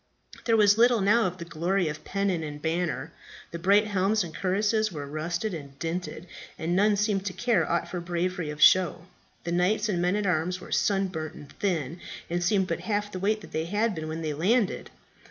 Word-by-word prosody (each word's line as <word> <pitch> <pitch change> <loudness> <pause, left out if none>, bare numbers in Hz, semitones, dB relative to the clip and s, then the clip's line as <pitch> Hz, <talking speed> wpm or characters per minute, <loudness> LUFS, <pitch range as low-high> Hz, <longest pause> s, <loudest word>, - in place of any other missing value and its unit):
There 230 -1 +3
was 205 0 +5
little 240 0 +5
now 210 +2 +4
of 180 0 -5
the 170 - -7
glory 170 +2 0
of 150 0 -5
pennon 195 -4 -1
and 150 -1 -6
banner; 160 -2 -2 0.4
the 170 - -5
bright 200 +5 +4
helms 205 +1 +1
and 165 -2 -8
cuirasses 210 +3 +1
were 145 -4 -5
rusted 170 +7 -3
and 140 -4 -8
dinted, 170 +1 -4 0.3
and 170 +2 -1
none 205 +2 +4
seemed 200 -1 0
to 185 - -3
care 240 +2 +1
aught 170 - 0
for 180 - -4
bravery 175 -1 -2
of 150 0 -6
show. 180 0 +5 0.4
The 170 - -3
knights 205 +5 +1
and 175 -4 0
men 180 +2 +2
at 210 -1 -1
arms 180 0 0
were - - -12
sunburnt 190 -6 0
and 145 -1 -12
thin, 170 -5 -1 0.3
and 175 0 0
seemed 190 +1 +2
but - - -2
half 205 -1 -2
the 185 - -5
weight 215 +3 0
that - - -12
they 160 +1 -2
had 210 +5 0
been 160 -2 -5
when 160 +1 -4
they 155 -1 -2
landed. 200 - +1
180 Hz, 210 wpm, -27 LUFS, 165-205 Hz, 0.4 s, was